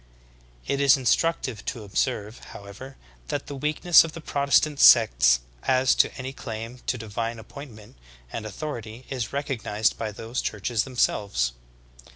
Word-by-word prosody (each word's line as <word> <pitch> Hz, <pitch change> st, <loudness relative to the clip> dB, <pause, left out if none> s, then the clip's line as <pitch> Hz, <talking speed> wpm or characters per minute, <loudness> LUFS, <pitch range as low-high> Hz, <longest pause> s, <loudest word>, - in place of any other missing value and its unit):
It 140 Hz, -, -1 dB
is 140 Hz, 0 st, +6 dB
instructive 130 Hz, -3 st, 0 dB
to 115 Hz, -, -4 dB
observe, 105 Hz, +1 st, -2 dB, 0.2 s
however, 100 Hz, +7 st, -11 dB, 0.3 s
that -, -, -3 dB
the -, -, -7 dB
weakness 150 Hz, +5 st, +4 dB
of 165 Hz, -1 st, -7 dB
the -, -, -8 dB
Protestant 140 Hz, 0 st, +1 dB
sects 65 Hz, -, +6 dB, 0.2 s
as 130 Hz, 0 st, +3 dB
to -, -, +3 dB
any 130 Hz, 0 st, -6 dB
claim 115 Hz, 0 st, -7 dB
to 125 Hz, -, 0 dB
divine 115 Hz, +1 st, -4 dB
appointment 110 Hz, -, -12 dB, 0.4 s
and 115 Hz, -, -4 dB
authority, 115 Hz, 0 st, -7 dB
is 125 Hz, -4 st, -3 dB
recognized 120 Hz, -6 st, -1 dB
by 110 Hz, -2 st, -3 dB
those 115 Hz, +4 st, -4 dB
churches 105 Hz, +2 st, -2 dB
themselves. 100 Hz, -, 0 dB
120 Hz, 140 wpm, -25 LUFS, 105-135 Hz, 0.4 s, is